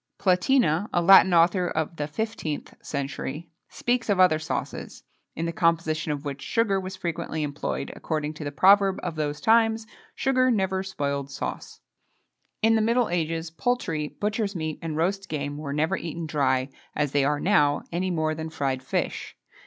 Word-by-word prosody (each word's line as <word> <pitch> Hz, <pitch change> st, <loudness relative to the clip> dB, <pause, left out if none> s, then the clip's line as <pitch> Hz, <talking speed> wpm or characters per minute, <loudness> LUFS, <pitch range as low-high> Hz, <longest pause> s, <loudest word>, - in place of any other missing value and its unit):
Platina, 185 Hz, -, +2 dB
a -, -, +2 dB
Latin 190 Hz, +1 st, +7 dB
author 175 Hz, +1 st, +4 dB
of 160 Hz, 0 st, -2 dB
the 145 Hz, -, -1 dB
15th 155 Hz, -3 st, -4 dB
century, 140 Hz, +2 st, -4 dB, 0.2 s
speaks 245 Hz, -2 st, -1 dB
of 200 Hz, -2 st, +2 dB
other 180 Hz, -4 st, +5 dB
sauces, 155 Hz, -, -5 dB, 0.3 s
in 165 Hz, -, -2 dB
the 170 Hz, -, -1 dB
composition 165 Hz, -2 st, +1 dB
of 145 Hz, 0 st, -4 dB
which 140 Hz, -1 st, -5 dB
sugar 220 Hz, -4 st, +1 dB
was 190 Hz, 0 st, -6 dB
frequently 170 Hz, -3 st, -3 dB
employed, 145 Hz, 0 st, -3 dB
according 155 Hz, -1 st, -3 dB
to 155 Hz, -, -8 dB
the 145 Hz, -, -4 dB
proverb 195 Hz, +4 st, +5 dB
of -, -, -2 dB
those 150 Hz, -1 st, -2 dB
times: 225 Hz, 0 st, +3 dB, 0.3 s
"Sugar 260 Hz, -3 st, +2 dB
never 190 Hz, -4 st, +1 dB
spoiled 140 Hz, -7 st, -3 dB
sauce." 135 Hz, -, -6 dB, 0.8 s
In 225 Hz, +1 st, +5 dB
the 220 Hz, -, +3 dB
middle 235 Hz, +2 st, +2 dB
ages, 165 Hz, -1 st, -2 dB
poultry, 165 Hz, -, -1 dB
butchers' 210 Hz, +3 st, -2 dB
meat, 155 Hz, -2 st, -3 dB
and 160 Hz, -2 st, -4 dB
roast 190 Hz, +4 st, -1 dB
game, 145 Hz, -1 st, -3 dB
were 145 Hz, -2 st, -5 dB
never 155 Hz, +6 st, +1 dB
eaten 170 Hz, -1 st, -5 dB
dry, 135 Hz, -3 st, +1 dB, 0.3 s
as 150 Hz, -2 st, 0 dB
they 140 Hz, -1 st, +2 dB
are 145 Hz, +1 st, +1 dB
now, 150 Hz, -7 st, +3 dB
any 180 Hz, +2 st, -1 dB
more 155 Hz, -3 st, 0 dB
than 160 Hz, +1 st, -5 dB
fried 135 Hz, -4 st, -2 dB
fish. -, -, -3 dB
165 Hz, 170 wpm, -26 LUFS, 150-195 Hz, 0.8 s, Latin